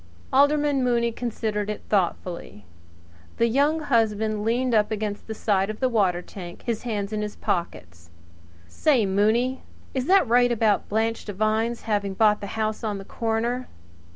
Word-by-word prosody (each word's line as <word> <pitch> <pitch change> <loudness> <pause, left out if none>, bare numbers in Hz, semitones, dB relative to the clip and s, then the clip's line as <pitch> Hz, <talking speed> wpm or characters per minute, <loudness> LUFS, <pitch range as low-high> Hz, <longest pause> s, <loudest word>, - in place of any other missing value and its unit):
Alderman 285 0 +3
Mooney 235 -1 +2
considered 220 -3 -3
it 210 - -5
thoughtfully. 175 - -2 0.7
The 230 - +3
Young 285 +7 +2
Husband 220 -5 +1
leaned 240 +3 +1
up 210 -2 +3
against 210 -1 -4
the 220 - -5
side 195 -2 +1
of 215 - -5
the 255 -1 +1
cistern, 180 -3 -1
his 230 -3 -2
hands 210 -3 -3
in 210 - -1
his 210 0 -4
pockets. 85 - -4 0.6
"Say, 245 - +2
Mooney, 220 +7 +1 0.3
is 260 0 -2
that 375 -6 +5
right 245 +1 +4
about 220 -3 +1
Blanche 225 +2 0
Devine's 215 +3 -1
having 205 -3 -1
bought 210 0 +3
the 200 - -5
house 215 0 -1
on 210 -2 -2
the 195 - -9
corner?" 230 +4 -2
220 Hz, 155 wpm, -24 LUFS, 205-240 Hz, 0.7 s, that